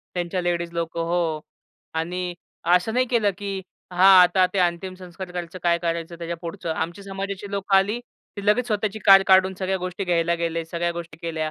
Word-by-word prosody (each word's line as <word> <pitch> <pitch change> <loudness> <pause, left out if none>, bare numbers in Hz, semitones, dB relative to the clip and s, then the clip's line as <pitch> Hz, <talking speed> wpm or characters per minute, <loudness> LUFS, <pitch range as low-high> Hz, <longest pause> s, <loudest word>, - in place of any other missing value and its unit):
त्यांच्या 175 +1 -1
लेडीज 170 -1 -1
लोकं 170 0 -3
हो. 165 -2 0 0.5
आणि 175 +2 -3 0.4
असं 180 +5 +2
नाही 255 +1 +2
केलं 230 -4 +2
की 200 -1 -4 0.3
हां, 185 +1 +8
आता 185 +1 +4
ते - - +1
अंतिम 180 +1 0
संस्कार 185 0 -9
करायचं? 175 0 -6
काय 170 -1 +3
करायचं 170 0 -3
त्याच्या 170 0 -4
पुढचं? 170 -1 -5
आमच्या 170 +5 -4
समाजाची 195 0 -5
लोकं 200 0 +1
आली. 200 +4 +2
ते 205 -4 -13
लगेच 230 +4 +3
स्वतःची 215 -1 -1
कार 195 -1 +9
काढून 190 0 +5
सगळ्या 190 0 -1
गोष्टी 185 +2 -4
घ्यायला 170 -1 +1
गेले. 165 -1 -2
सगळ्या 170 +1 -2
गोष्टी 170 -2 -8
केल्या. 160 -2 -2
180 Hz, 185 wpm, -23 LUFS, 170-195 Hz, 0.5 s, कार